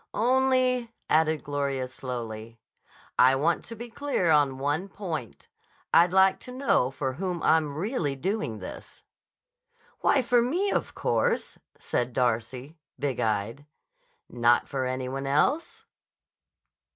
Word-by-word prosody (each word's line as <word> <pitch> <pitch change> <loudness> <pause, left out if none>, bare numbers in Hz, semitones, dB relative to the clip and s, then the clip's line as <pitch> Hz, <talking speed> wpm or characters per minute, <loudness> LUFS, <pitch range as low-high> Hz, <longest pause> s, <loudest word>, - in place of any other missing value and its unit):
"Only," 255 0 +2 0.2
added 155 0 +3
Gloria 140 -2 -2
slowly, 115 -3 -6 0.6
"I 130 +1 +6
want 160 +5 +1
to 230 - -7
be 235 +2 -7
clear 230 - 0
on 145 -3 +3
one 145 +8 -1
point. 165 - -6 0.5
I'd 170 +1 +6
like 190 0 +4
to 250 - -10
know 255 - +2
for 135 -1 -3
whom 180 +3 -3
I'm 155 -3 +2
really 170 - -1
doing 175 - -2
this." 95 - -10 1.0
"Why, 270 - +3
for 245 0 +3
me, 350 +12 0
of - - -2
course," - - 0 0.2
said 120 0 -2
Darcy, 125 +5 -1 0.2
big 140 -3 -2
eyed. 110 +6 -2 0.6
"Not 120 0 +2
for 130 -2 -2
any 130 0 -3
one 135 +1 -4
else?" 150 - 0
145 Hz, 125 wpm, -27 LUFS, 130-205 Hz, 1.0 s, I